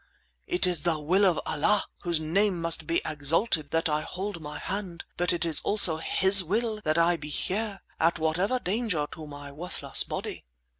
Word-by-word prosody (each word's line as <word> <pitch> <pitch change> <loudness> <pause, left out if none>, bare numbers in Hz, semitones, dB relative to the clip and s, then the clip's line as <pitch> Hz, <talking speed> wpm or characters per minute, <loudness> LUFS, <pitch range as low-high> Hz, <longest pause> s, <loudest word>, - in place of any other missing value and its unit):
It 180 - +1
is 175 -4 0
the 165 -1 0
will 180 +7 +2
of 175 - +2
Allah, 190 +7 +1 0.2
whose 170 -2 +1
name 170 +2 +1 0.2
be 165 - +1
exalted, 155 +2 0
that 165 0 0
I 150 -1 0
hold 190 +1 -5
my 150 -1 -7
hand, 190 -3 -5
but 175 0 +1
it 170 -1 0
is 165 -2 +4
also 185 -6 +5
His 190 +4 +3
will 215 +4 -1
that 155 -3 +1
I 170 +1 +3
be 150 -2 -8
here, 200 +6 -2 0.2
at 165 +1 +2
whatever 175 +9 0
danger 200 -7 -1
to 155 -1 -9
my 145 -1 -9
worthless 170 +6 +1
body." - - -6
170 Hz, 180 wpm, -27 LUFS, 155-195 Hz, 0.2 s, also